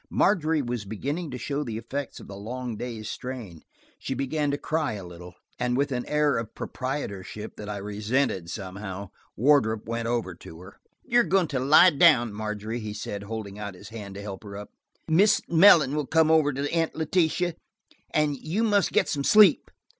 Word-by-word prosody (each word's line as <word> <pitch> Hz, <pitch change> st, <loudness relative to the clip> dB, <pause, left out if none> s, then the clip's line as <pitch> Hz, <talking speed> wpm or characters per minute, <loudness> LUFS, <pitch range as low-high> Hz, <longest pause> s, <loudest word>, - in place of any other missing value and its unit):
Margery 160 Hz, -6 st, +2 dB
was 120 Hz, -3 st, -3 dB
beginning 140 Hz, -, -4 dB
to 125 Hz, -, -5 dB
show 145 Hz, +3 st, -3 dB
the 115 Hz, -5 st, -5 dB
effect 135 Hz, +5 st, -5 dB
of -, -, -12 dB
the 100 Hz, -, -9 dB
long 120 Hz, +4 st, -5 dB
day's 110 Hz, -1 st, -6 dB
strain; 115 Hz, -11 st, -7 dB, 0.4 s
she 135 Hz, -, -4 dB
began 145 Hz, +2 st, -1 dB
to 140 Hz, -, 0 dB
cry 155 Hz, -3 st, -1 dB
a 100 Hz, -3 st, -7 dB
little, 90 Hz, 0 st, -11 dB, 0.2 s
and 125 Hz, 0 st, 0 dB
with 140 Hz, +1 st, 0 dB
an 125 Hz, -2 st, -3 dB
air 150 Hz, -3 st, +2 dB
of 115 Hz, -, -7 dB
proprietorship 110 Hz, -6 st, -5 dB
that 105 Hz, 0 st, -7 dB
I 105 Hz, -, -3 dB
resented, 105 Hz, -1 st, -1 dB
somehow, 95 Hz, 0 st, -6 dB, 0.3 s
Wardrop 110 Hz, -4 st, +3 dB
went 115 Hz, 0 st, -3 dB
over 115 Hz, -6 st, -1 dB
to 80 Hz, -1 st, -12 dB
her. 95 Hz, +2 st, -14 dB, 0.3 s
"You 245 Hz, -2 st, +3 dB
are -, -, +5 dB
going 180 Hz, 0 st, +1 dB
to 135 Hz, -, -1 dB
lie 150 Hz, +7 st, +7 dB
down, 140 Hz, -8 st, +4 dB
Margery," 105 Hz, +2 st, -4 dB
he 105 Hz, -2 st, -5 dB
said, 105 Hz, -1 st, -5 dB
holding 105 Hz, -1 st, -6 dB
out 100 Hz, -2 st, -6 dB
his 95 Hz, +2 st, -12 dB
hand 105 Hz, -4 st, -8 dB
to 100 Hz, -, -7 dB
help 100 Hz, -1 st, -7 dB
her 100 Hz, -1 st, -8 dB
up. 105 Hz, -, -9 dB, 0.4 s
"Mrs. 190 Hz, +6 st, +3 dB
Mellon 165 Hz, -5 st, +6 dB
will 150 Hz, -3 st, -2 dB
come 160 Hz, -1 st, +3 dB
over 155 Hz, -2 st, +4 dB
to 140 Hz, +1 st, -2 dB
Aunt 165 Hz, -1 st, 0 dB
Letitia, 170 Hz, +2 st, +1 dB, 0.6 s
and 150 Hz, -1 st, +1 dB
you 175 Hz, -, -2 dB
must 205 Hz, -3 st, +2 dB
get -, -, +2 dB
some 140 Hz, -2 st, -2 dB
sleep." 205 Hz, -2 st, +6 dB
125 Hz, 190 wpm, -26 LUFS, 105-150 Hz, 0.6 s, lie